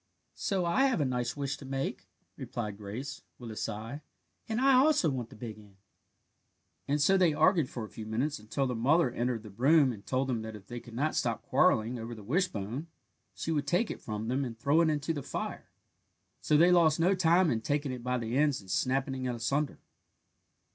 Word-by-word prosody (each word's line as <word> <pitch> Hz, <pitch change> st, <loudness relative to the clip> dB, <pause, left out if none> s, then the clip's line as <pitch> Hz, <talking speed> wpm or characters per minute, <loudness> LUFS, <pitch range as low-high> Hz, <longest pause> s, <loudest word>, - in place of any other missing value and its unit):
"So 190 Hz, -3 st, -1 dB
have 260 Hz, +6 st, +2 dB
I -, -, +3 dB
a -, -, 0 dB
nice 125 Hz, 0 st, -2 dB
wish 140 Hz, -1 st, -2 dB
to 140 Hz, -, -11 dB
make," 135 Hz, 0 st, -3 dB, 0.3 s
replied 105 Hz, -4 st, -5 dB
Grace, 115 Hz, +7 st, -6 dB, 0.2 s
with 120 Hz, -2 st, -8 dB
a -, -, -7 dB
sigh, 115 Hz, +7 st, -5 dB, 0.5 s
"and 220 Hz, +1 st, 0 dB
I 270 Hz, +1 st, +5 dB
also 260 Hz, -, +4 dB
want 125 Hz, -4 st, -4 dB
the -, -, -13 dB
big 110 Hz, -1 st, -7 dB
end." 100 Hz, -2 st, -17 dB, 1.1 s
And 145 Hz, +2 st, +1 dB
so 190 Hz, +7 st, +4 dB
they 170 Hz, -5 st, +4 dB
argued 160 Hz, -2 st, +3 dB
for 120 Hz, -, -5 dB
a -, -, -12 dB
few 110 Hz, -1 st, -8 dB
minutes, 125 Hz, +7 st, -1 dB
until 110 Hz, +6 st, -2 dB
their 125 Hz, -2 st, -2 dB
mother 140 Hz, +5 st, +3 dB
entered 120 Hz, -2 st, -2 dB
the 105 Hz, -, -10 dB
room 135 Hz, +5 st, +4 dB
and 100 Hz, -3 st, -11 dB
told 130 Hz, +4 st, -1 dB
them 120 Hz, -4 st, -1 dB
that 110 Hz, 0 st, -7 dB
if 100 Hz, -2 st, -12 dB
they 120 Hz, +4 st, -6 dB
could 115 Hz, 0 st, -12 dB
not 150 Hz, +5 st, 0 dB
stop -, -, -1 dB
quarrelling 115 Hz, +3 st, +2 dB
over 115 Hz, +1 st, -6 dB
the 110 Hz, -, -11 dB
wishbone 135 Hz, -, -2 dB, 0.5 s
she 165 Hz, -, -3 dB
would 145 Hz, -2 st, -1 dB
take 180 Hz, +9 st, +1 dB
it -, -, -7 dB
from 110 Hz, 0 st, -4 dB
them 130 Hz, +3 st, 0 dB
and 120 Hz, -3 st, -5 dB
throw 145 Hz, +7 st, +3 dB
it 165 Hz, -, +3 dB
into 150 Hz, +1 st, -1 dB
the 145 Hz, -, -4 dB
fire. -, -, -5 dB, 0.7 s
So 150 Hz, -, +2 dB
they 175 Hz, +3 st, +6 dB
lost 165 Hz, -3 st, +4 dB
no 180 Hz, +4 st, +4 dB
time 175 Hz, -2 st, +4 dB
in 110 Hz, -, 0 dB
taking 145 Hz, +2 st, -1 dB
it 125 Hz, -1 st, -5 dB
by 125 Hz, +1 st, -1 dB
the 115 Hz, 0 st, -3 dB
ends 145 Hz, -1 st, +2 dB
and 95 Hz, -2 st, -10 dB
snapping 130 Hz, +4 st, 0 dB
it 125 Hz, -1 st, -1 dB
asunder. 135 Hz, +5 st, -1 dB
135 Hz, 215 wpm, -30 LUFS, 115-155 Hz, 1.1 s, they